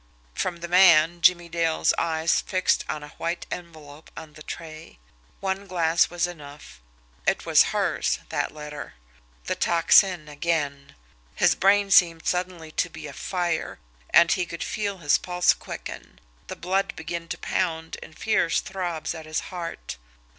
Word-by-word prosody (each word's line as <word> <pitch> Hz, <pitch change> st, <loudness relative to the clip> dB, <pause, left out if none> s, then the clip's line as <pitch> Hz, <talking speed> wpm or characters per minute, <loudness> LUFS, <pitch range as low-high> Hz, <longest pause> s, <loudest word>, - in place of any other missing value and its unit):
From 170 Hz, -, -3 dB
the 170 Hz, -, -4 dB
man, 170 Hz, -2 st, +5 dB
Jimmie 175 Hz, -1 st, +4 dB
Dale's 165 Hz, -1 st, +1 dB
eyes 160 Hz, 0 st, +1 dB
fixed 185 Hz, -1 st, +1 dB
on 150 Hz, -1 st, -3 dB
a 150 Hz, -, -10 dB
white 170 Hz, +1 st, -3 dB
envelope 155 Hz, -3 st, -9 dB
on 155 Hz, -2 st, -9 dB
the 155 Hz, -, -14 dB
tray. 155 Hz, -, -9 dB, 0.4 s
One 195 Hz, 0 st, -2 dB
glance 170 Hz, -2 st, +2 dB
was 175 Hz, 0 st, 0 dB
enough 145 Hz, -, -11 dB, 0.5 s
it -, -, +1 dB
was -, -, +6 dB
HERS, -, -, 0 dB
that -, -, -1 dB
letter. 150 Hz, -, -8 dB, 0.5 s
The -, -, -1 dB
Tocsin 170 Hz, 0 st, +4 dB
again! 145 Hz, -2 st, -2 dB, 0.4 s
His -, -, +4 dB
brain 200 Hz, +1 st, +3 dB
seemed 165 Hz, -3 st, +5 dB
suddenly 180 Hz, -3 st, -2 dB
to -, -, -1 dB
be 155 Hz, -1 st, -10 dB
afire, 170 Hz, +3 st, -3 dB, 0.3 s
and 170 Hz, 0 st, +6 dB
he 180 Hz, -2 st, +1 dB
could 170 Hz, -, -5 dB
feel 205 Hz, -2 st, -3 dB
his 150 Hz, -5 st, +2 dB
pulse 180 Hz, 0 st, +2 dB
quicken, -, -, -9 dB, 0.3 s
the -, -, -6 dB
blood 190 Hz, +3 st, -1 dB
begin 165 Hz, +1 st, -5 dB
to -, -, -5 dB
pound 165 Hz, -3 st, -2 dB
in -, -, -12 dB
fierce 190 Hz, -5 st, +1 dB
throbs 175 Hz, -5 st, -4 dB
at 160 Hz, -2 st, -9 dB
his 155 Hz, -, -1 dB
heart. 170 Hz, -, -6 dB
170 Hz, 150 wpm, -25 LUFS, 155-180 Hz, 0.5 s, was